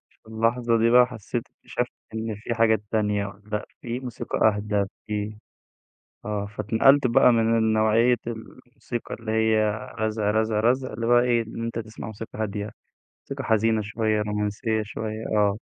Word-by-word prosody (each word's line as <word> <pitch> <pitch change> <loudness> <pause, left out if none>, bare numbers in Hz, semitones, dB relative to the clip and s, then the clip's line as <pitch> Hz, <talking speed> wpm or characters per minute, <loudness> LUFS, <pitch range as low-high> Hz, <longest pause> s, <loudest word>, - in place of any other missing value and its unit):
في - - -32
اللحظة 115 +1 +1
دي 115 +1 +3
بقى 125 0 +7
حسيت 115 0 -4
اكتشفت 125 0 -4 0.2
إن 110 0 -3
في 110 +3 -4
حاجات 110 -2 +3
تانية 105 -2 +1
والّا 105 +2 -6 0.2
فيه 120 +1 -4
موسيقى 125 -3 -4
أهدى 105 -1 0 0.2
فيه 105 0 -3 0.9
آه، 105 -1 -2
فاتنقلت 110 +7 +3
بقى 120 +1 +5
من 115 0 +3
النوعية 110 +2 +3
الموسيقى 120 +1 -7
اللي 110 -1 -5
هي 110 -1 +3 0.3
رزع، 110 -1 0
رزع، 110 0 +1
رزع 130 +2 +1
اللي 115 +1 -3
هو 120 0 +6
إيه؟ 120 -1 +2
لإن 115 +1 -7
أنت 115 0 -3
تسمع 110 0 -8
موسيقى 110 0 -8
هادية، 105 -1 -3 0.6
موسيقى 140 -1 -5
حزينة 110 -1 +2
شوية، 110 0 0
رومانسية 105 +2 -1
شوية، 110 +1 -5
آه. 105 0 +2
110 Hz, 155 wpm, -25 LUFS, 105-115 Hz, 0.9 s, بقى